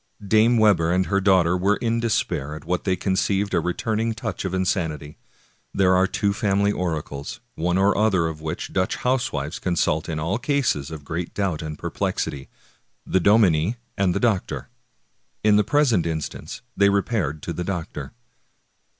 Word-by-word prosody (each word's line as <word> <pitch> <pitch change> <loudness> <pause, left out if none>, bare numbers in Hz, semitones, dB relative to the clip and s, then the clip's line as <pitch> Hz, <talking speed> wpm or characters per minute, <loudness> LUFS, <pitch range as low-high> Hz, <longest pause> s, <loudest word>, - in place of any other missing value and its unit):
Dame 110 +4 +4
Webber 100 -7 +4
and 90 +1 +2
her 100 +1 +1
daughter 95 -3 +4
were 95 +3 +2
in 115 +1 -1
despair 75 -10 -1
at 80 0 -10
what 90 +1 -2
they 95 -2 +2
conceived 100 +2 0
a - - +3
returning 110 +5 -1
touch 110 -5 -4
of 95 - -3
insanity. 80 -6 -2 0.6
There 95 -1 +4
are 95 +1 +4
two 100 +1 0
family 100 -1 +1
oracles, 80 -7 -4
one 90 +2 0
or 100 +1 +3
other 100 -5 +2
of 80 -1 -4
which 80 0 -5
Dutch 95 0 0
housewives 95 - -1
consult 85 -3 0
in 80 -1 -2
all 90 +9 -1
cases 135 - 0
of 75 -3 -8
great 85 +3 -4
doubt 95 -6 -1
and 75 -1 -6
perplexity, 70 -1 -3 0.3
— - - -45
the 95 - +5
dominie 100 -1 +4 0.2
and 95 -3 +1
the - - +1
doctor. 110 -6 -1 0.7
In 105 -1 +5
the 105 - +4
present 120 - +2
instance 80 -2 -5
they 100 0 +4
re 100 -1 +2
paired 80 - -2
to 85 - -3
the 90 - -3
doctor. 80 -7 -5
95 Hz, 170 wpm, -23 LUFS, 80-105 Hz, 0.7 s, the